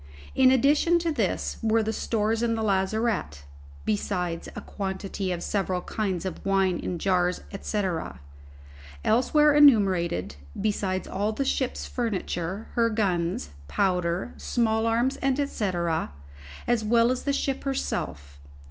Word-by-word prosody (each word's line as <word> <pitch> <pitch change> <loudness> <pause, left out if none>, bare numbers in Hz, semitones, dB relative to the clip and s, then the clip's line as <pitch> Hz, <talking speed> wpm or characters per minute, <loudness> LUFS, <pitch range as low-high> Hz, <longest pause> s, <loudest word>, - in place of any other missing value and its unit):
In 260 -1 +5
addition 290 +6 +4
to 335 -1 -1
this 225 -10 -1
were 225 0 +2
the 220 +1 -2
stores 225 0 0
in 230 -1 +1
the 220 - -2
lazarette 195 - 0 0.4
(besides 170 - -2
a - - -4
quantity 190 -1 -4
of 175 -1 -3
several 190 -3 -1
kinds 190 -4 -3
of 185 - -5
wine 195 -2 +2
in 180 - -3
jars, 180 0 +1 0.2
&c.) 210 -1 -1 1.2
elsewhere 295 +6 +4
enumerated, 190 - +4 0.2
besides 195 -3 -1
all 205 +3 -1
the 275 +5 -2
ship's 260 -1 -1
furniture, 200 -4 -3
her 230 -1 +2
guns, 175 - -1 0.2
powder, 180 - 0
small 225 -2 0
arms, 235 +4 +1
&c, 270 -7 0 0.9
as 240 -2 +1
well 230 +2 +4
as 255 - -2
the 285 - -1
ship 275 -1 -1
herself. 70 - -3
210 Hz, 130 wpm, -26 LUFS, 185-240 Hz, 1.2 s, In